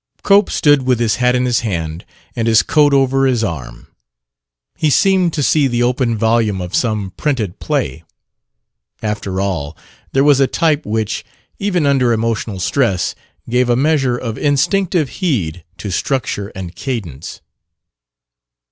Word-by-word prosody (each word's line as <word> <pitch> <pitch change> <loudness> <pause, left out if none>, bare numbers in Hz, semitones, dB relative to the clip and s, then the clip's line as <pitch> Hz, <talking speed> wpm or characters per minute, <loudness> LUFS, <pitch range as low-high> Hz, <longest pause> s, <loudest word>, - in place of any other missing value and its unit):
Cope 200 0 +4
stood 145 -2 +3
with 125 -2 +1
his 115 -2 +1
hat 125 0 +2
in 125 0 +1
his 120 -1 +2
hand 85 -7 -4 0.3
and 115 -1 -1
his 110 -2 +5
coat 150 -2 +3
over 135 0 +3
his 120 -3 +1
arm. 65 - -5 0.9
He 155 - +1
seemed 185 +2 +3
to 150 - -1
see 145 0 +3
the 120 -1 0
open 120 -2 0
volume 110 -2 +1
of 90 -1 -6
some 105 -5 -1
"printed 115 - -2
play." 65 +5 -2 1.0
After 105 -3 -3
all, 85 -6 -3 0.3
there 135 - +2
was 145 -2 +5
a 135 - +4
type 155 -4 0
which, 110 0 -2 0.4
even 180 -6 0
under 130 -4 +3
emotional 110 -3 -2
stress, 95 -4 0 0.3
gave 125 +1 +1
a 120 - +4
measure 135 -2 +1
of 115 -3 -5
instinctive 170 +3 +1
heed 90 - -1
to 100 - -5
structure 105 -1 -2
and 95 -2 -7
cadence. 85 - -6
120 Hz, 150 wpm, -17 LUFS, 100-140 Hz, 1.0 s, his